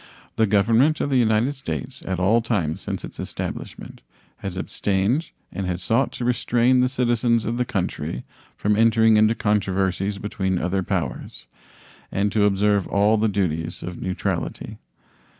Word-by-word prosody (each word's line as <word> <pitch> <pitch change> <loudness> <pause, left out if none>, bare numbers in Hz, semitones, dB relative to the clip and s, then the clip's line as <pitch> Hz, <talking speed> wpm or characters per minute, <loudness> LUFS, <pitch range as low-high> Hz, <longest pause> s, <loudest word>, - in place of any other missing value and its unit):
The 110 - +3
Government 115 +9 +3
of 140 - -1
the 130 - +3
United 115 +3 +2
States 80 - -6
at 95 -1 -1
all 105 +6 +3
times 95 -7 -1
since 100 -2 -4
its - - -12
establishment - - -6 0.4
has 95 -2 -6
abstained 100 - 0 0.2
and 95 +1 -4
has 90 0 -3
sought 115 +9 +1
to 120 - -4
restrain 125 +1 +2
the 125 0 +3
citizens 120 -3 +1
of 115 +2 -2
the 125 - 0
country 90 - -3 0.3
from 105 0 +1
entering 110 0 +4
into 110 +1 +4
controversies 100 -2 0
between 100 -3 -2
other 90 +2 0
powers, 85 - -4 0.7
and 100 +1 0
to 105 -1 +3
observe 100 0 +2
all 105 +2 +3
the 110 +1 +2
duties 85 -4 -2
of 90 0 -6
neutrality. 95 -1 -3
105 Hz, 150 wpm, -23 LUFS, 95-115 Hz, 0.7 s, entering